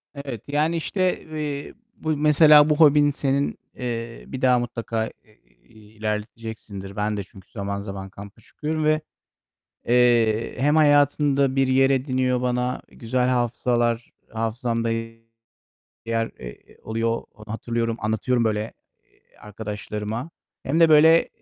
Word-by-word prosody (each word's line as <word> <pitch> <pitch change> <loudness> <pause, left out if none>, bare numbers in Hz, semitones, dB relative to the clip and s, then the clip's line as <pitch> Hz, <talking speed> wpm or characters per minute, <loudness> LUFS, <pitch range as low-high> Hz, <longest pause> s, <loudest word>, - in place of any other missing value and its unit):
Evet, 135 -6 -6
yani, 155 +4 +1
işte, 185 +2 -1
eee, 150 -2 -5 0.2
bu 155 -1 -2
mesela 150 0 +6
bu 150 - +3
hobin 145 -2 +5
senin, 140 0 -1 0.2
eee, 115 -2 -5
bir 130 - -7
daha 125 -1 +4
mutlaka 115 -2 -3
i - - -10 0.6
i 115 - -22
iii, 110 0 -18
ilerleteceksindir. 105 -2 -5
Ben 105 0 -1
de 100 - -3
çünkü 95 0 -17
zaman 100 0 -4
zaman 95 -1 -7
kampa 100 +4 -12
çıkıyorum 155 +6 -4
ve, 155 0 +2 0.9
eee, 120 -2 +3
hem 145 +4 +2
hayatında 145 -2 +3
bir 135 -1 +3
yer 135 +1 +3
ediniyor 130 -2 +1
bana 125 0 -1
güzel 125 +2 -1
hafızalar 120 -1 0 0.2
hafızamda 115 +1 -2 1.2
yer, 115 0 -1
eee, - - -12
oluyor. 115 +1 -1 0.2
Hatırlıyorum, 115 +1 -2
anlatıyorum 115 +3 0
böyle, 105 -2 0 0.4
eee, - - -32
arkadaşlarıma 105 +4 -5 0.3
hem 150 +5 0
de, 165 -1 +6
böyle, 160 +2 +6
120 Hz, 130 wpm, -23 LUFS, 110-145 Hz, 1.2 s, mesela